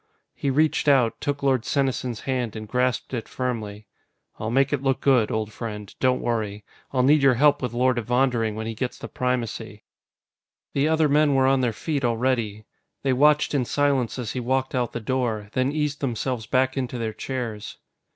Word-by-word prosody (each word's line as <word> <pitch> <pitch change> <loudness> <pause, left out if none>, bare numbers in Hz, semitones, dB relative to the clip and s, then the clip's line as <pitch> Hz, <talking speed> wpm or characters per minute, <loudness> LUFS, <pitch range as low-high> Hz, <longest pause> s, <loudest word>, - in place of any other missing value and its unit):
He 140 - -2
reached 155 +2 +2
out, 130 -5 +3
took 145 -1 -2
Lord 130 -4 +2
Senesin's 130 -4 -1
hand, 125 -4 -2
and 110 -1 -6
grasped 125 +2 -1
it 115 -3 -3
firmly. 110 -5 -4 0.5
"I'll 110 - -2
make 135 +4 +2
it 140 - 0
look 135 -1 +1
good, 125 -6 +3
old 110 -1 -2
friend, 105 -4 -6
don't 130 -1 +2
worry. 105 -3 -2 0.3
I'll 130 -2 +2
need 145 +3 +5
your 135 -2 +5
help 145 +3 +4
with 125 -3 -2
Lord 125 +1 +2
Evondering 120 -2 +1
when 110 0 -4
he 115 - -3
gets 125 +3 -4
the - - -7
Primacy." 115 -4 -3 0.9
The 140 +2 +2
other 160 -1 +3
men 145 0 +3
were 135 0 +4
on 135 0 +3
their 125 -2 +1
feet 145 +5 -3
already. 115 -3 0 0.4
They 135 -1 +2
watched 150 +4 +4
in 140 -3 +2
silence 135 -2 0
as 120 -4 -3
he 130 - -3
walked 130 +2 -1
out 125 -3 -1
the - - -3
door, 110 -3 -1
then 130 +2 +1
eased 150 -1 -2
themselves 125 -3 -2
back 130 +2 +1
into 125 -2 -3
their 110 -2 -3
chairs. 115 -3 -5
125 Hz, 190 wpm, -24 LUFS, 115-135 Hz, 0.9 s, need